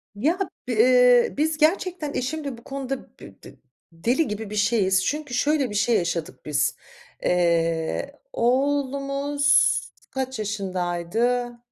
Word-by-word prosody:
Ya, 315 - 0 0.3
b - - -2
ııı, 250 +2 +5
biz 310 +1 +1
gerçekten 325 -1 +1
eşimle 280 -1 -3
bu 235 - -16
konuda, 270 -1 -4
bı - - -15
bı - - -12 0.4
deli 240 - 0
gibi 210 0 -5
bir 210 - -6
şeyiz, 200 -3 +2
çünkü 295 -3 -3
şöyle 285 0 +1
bir 205 - -6
şey 230 +3 +2
yaşadık 170 -2 -3
biz. 145 0 0 0.5
Eee, 170 - 0
oğlumuz 280 +2 +2 0.3
kaç 265 -2 -3
yaşındaydı? 205 +5 -1
245 Hz, 125 wpm, -24 LUFS, 200-280 Hz, 0.5 s, ııı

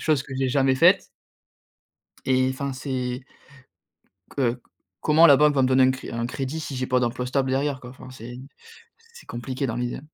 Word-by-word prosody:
chose 150 -4 +1
que 135 - -11
j'ai 130 -1 0
jamais 135 0 +2
faite. 180 +6 +5 1.2
Et 130 0 +2
enfin, 135 +1 -4
c'est 130 -1 -4 1.2
heu, 125 -2 0 0.4
comment 160 +2 +6
la 140 -2 +7
banque 150 0 +4
va 135 - +3
me 130 - +3
donner 130 0 +4
un 130 - +5
cré 130 - -7
un 115 0 -2
crédit, 135 +5 -4
si 145 -3 -6
j'ai 130 0 -2
pas 125 0 +2
d'emploi 125 +1 -2
stable 130 0 0
derrière, 135 0 0
quoi? 125 0 -11
Enfin 130 0 -13
c'est 120 -1 -9 0.7
c'est 475 - -14
compliqué 130 +3 -4
dans 115 - -3
l'idée. 120 0 -3
130 Hz, 190 wpm, -24 LUFS, 125-140 Hz, 1.2 s, la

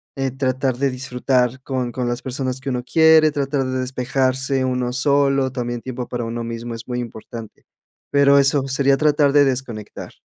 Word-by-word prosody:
eh, 135 -1 -1
tratar 130 -1 -1
de 135 +1 +1
disfrutar 125 0 0
con 130 -3 -2
con 125 0 -3
las 120 +2 -2
personas 130 0 -3
que 135 0 -5
uno 125 -1 -2
quiere, 160 +2 +5
tratar 140 -1 -1
de 130 0 -2
despejarse 130 +1 0
uno 125 -1 -1
solo, 135 0 +2
también 120 -2 -4
tiempo 125 -1 -6
para 120 -1 -4
uno 115 +1 -4
mismo 115 0 -5
es 115 +2 -10
muy 125 0 -3
importante, 115 -1 -9 0.5
pero 140 0 +5
eso 135 0 +3
sería 135 0 +2
tratar 145 -1 +3
de 145 -1 +6
desconectar. 125 -5 -4
130 Hz, 175 wpm, -21 LUFS, 125-140 Hz, 0.5 s, de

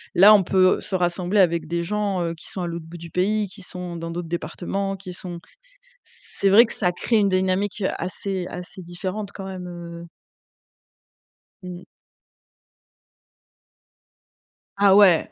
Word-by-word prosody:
Là, 200 +4 +9
on 205 - +6
peut 185 +1 +3
se 190 - -4
rassembler 180 +2 0
avec 170 -3 +3
des 170 +1 -2
gens, 200 0 -1
heu, 165 -1 -2
qui 165 - -11
sont 190 - -5
à - - -2
l'autre 170 -1 -6
bout 170 +1 -9
du 170 0 -10
pays, 205 +4 +1
qui 195 +2 -13
sont 180 -1 -7
dans 165 0 -5
d'autres 170 0 -5
départements, 175 +4 -3
qui 185 -1 -8
sont 175 -1 -8 0.6
c'est 195 - -3
vrai 220 +5 +8
que - - -5
ça 180 -4 0
crée 225 +6 0
une 205 -2 +3
dynamique, 190 +2 0
heu, 190 - +2
assez 185 +1 -4
assez 180 +1 -8
différente 185 +4 -5
quand 195 - -8
même, 185 -2 -7
heu 170 -1 -8 1.6
Mmh. 180 0 -8 2.9
Ah 200 -1 +5
ouais.! 190 -6 +6
185 Hz, 155 wpm, -23 LUFS, 175-195 Hz, 2.9 s, Là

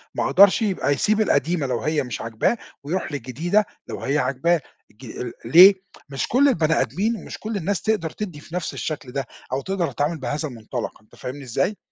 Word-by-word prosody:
ما - - 0
قدرش 200 +3 +6
يبقى 195 -9 0
يسيب 215 +9 +2
القديمة 160 -4 +1
لو 120 -3 -1
هي 155 -1 0
مش 125 -3 -5
عاجباه 115 - 0 0.3
ويروح 165 +3 -2
للجديدة 155 - 0 0.2
لو - - -6
هي 140 +2 0
عاجباه 145 +6 +1 0.3
ج 120 +1 -7
ليه؟ 180 +11 +9 0.4
مش 135 -1 -2
كل 275 +4 +4
البني 160 - +2
آدمين 215 +8 -1
مش - - -8
كل 220 0 -3
الناس 195 +1 -1
تقدر 215 -7 0
تدّي 180 -4 -6
في 160 +3 -10
نفس 180 -5 -3
الشَكل 145 -5 -4
ده 135 +1 -2 0.3
أو 135 - 0
تقدر 180 -3 -2
تتعامل 150 +5 -1
بهذا 150 +4 -2
المُنطلق 120 -2 -6
أنت 105 - -21
فاهمني 135 +3 -7
إزاي؟ 135 - -1
155 Hz, 185 wpm, -23 LUFS, 130-190 Hz, 0.4 s, ليه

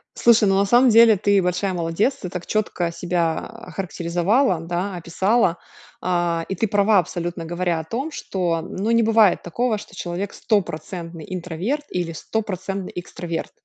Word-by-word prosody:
Слушай, 225 -4 +5
ну, 195 - +3
на 200 - +3
самом 245 +5 +5
деле 230 -1 +7
ты 200 0 +3
большая 180 +2 0
молодец, 175 +9 0
ты 180 - -6
так 180 -1 -6
чётко 195 -5 -1
себя 170 -1 0
охарактеризовала, 190 0 -1
да, 175 +4 -3
описала, 180 +3 +1 0.4
а, 175 -2 0
и 190 - -2
ты 220 +5 0
права 205 0 +4
абсолютно, 175 0 -3
говоря 175 0 -1
о - - -5
том, 255 - -4
что, 175 - -2
ну, 195 +6 -3
не 230 0 +4
бывает 220 -3 +4
такого, 225 +6 -1
что 205 - -12
человек 180 +2 -4
стопроцентный 170 -5 -3
интроверт 185 - -3
или 175 -2 -2
стопроцентный 195 +1 -4
экстраверт. 175 -1 -5
185 Hz, 155 wpm, -22 LUFS, 170-215 Hz, 0.4 s, деле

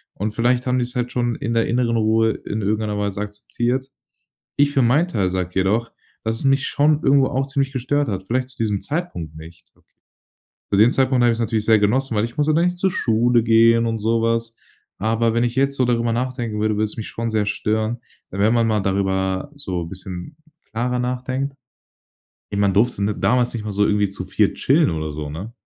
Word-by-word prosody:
Und 105 +2 -2
vielleicht 120 +2 +1
haben 125 0 +2
die's 125 0 -3
halt 125 0 -2
schon 120 -1 0
in 115 +1 -3
der 115 - +3
inneren 120 -1 +1
Ruhe 110 0 +3
in 105 +1 -5
irgendeiner 105 +1 -1
Weise 100 0 -2
akzeptiert. 120 +5 -3 0.7
Ich 145 0 +3
für 135 - +2
meinen 145 +9 +3
Teil 100 - 0
sage 90 -1 -2
jedoch, 105 +5 +1 0.3
dass 110 0 -1
es - - -6
mich 135 +1 +2
schon 150 +1 +2
irgendwo 135 -1 +4
auch 135 +2 -1
ziemlich 135 -1 -1
gestört 145 +2 0
hat, 95 -3 -3
vielleicht 130 +3 -1
zu - - -14
diesem 105 -3 -1
Zeitpunkt 140 - -4
nicht 80 +1 -14
Okay. - - -34 0.8
Zu - - +4
dem 110 +4 +6
Zeitpunkt 130 -1 +2
habe 120 - +5
ich 115 - 0
es - - -5
natürlich 110 -1 -1
sehr 110 -1 +5
genossen, 115 +4 +1
weil 105 - +2
ich 120 +5 -6
musste 150 +1 +2
dann 165 +2 +3
nicht 180 0 0
zur 190 +1 +2
Schule 120 - +2
gehen, 115 +1 +5
und 115 -1 -1
so 115 +2 +1
was. 115 0 -1 0.4
Aber 115 +2 +1
wenn 120 - +2
ich 120 0 -1
jetzt 140 +1 +1
so 130 - +2
darüber 120 -1 +1
nachdenken 120 -3 -3
würde, 110 -1 +1
würde 110 - +1
es 105 - -5
mich 110 - -5
schon 115 0 -3
sehr 110 -1 +1
stören. 110 +2 -1 0.3
We 95 - -7
wenn 105 +3 +3
man 115 -1 +3
mal 110 -1 +1
darüber 95 +3 -1
so 95 - -4
bisschen 95 - -8 0.4
klarer 125 +2 -1
nachdenkt 130 +2 -2 1.0
Ey, 100 - -3
man 100 -1 +3
durfte 110 0 +2
n 105 +1 -1
damals 125 -1 +2
nicht 115 - -3
mal 105 - -4
so 105 +1 +2
irgendwie 105 -1 +2
zu - - -7
4 - - +1
chillen - - +3
oder 80 -2 -3
so, 75 0 -5
ne? 95 +10 -7
115 Hz, 220 wpm, -21 LUFS, 105-125 Hz, 1.0 s, dem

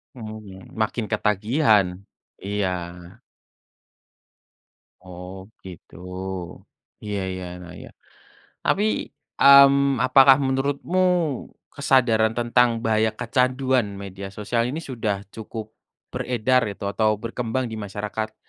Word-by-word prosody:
Mhm, 110 -4 -10
makin 110 +1 -1
ketagihan. 105 0 +2 0.6
Iya. 100 -1 -1 2.3
Oh, 90 +1 -9 0.3
gitu. 90 -3 -12 1.1
Iya 105 -1 -3
iya, 95 -1 -6 0.2
nah, 85 -1 -11
iya. - - -11 0.8
Tapi, 205 - +2 0.6
mmm, 140 -2 +6
apakah 135 +1 +7
menurutmu 140 +7 -1 0.7
kesadaran 115 -6 +2
tentang 120 -1 +2
bahaya 110 0 +2
kecanduan 130 -5 0
media 100 0 -8
sosial 105 +4 -2
ini 155 +6 -4
sudah 110 -7 -3
cukup 110 0 -8 0.4
beredar 125 0 +1
itu 100 -1 -7
atau 110 0 +1
berkembang 115 +3 -3
di 110 - -5
masyarakat? 105 +2 -5
110 Hz, 95 wpm, -23 LUFS, 105-130 Hz, 2.3 s, apakah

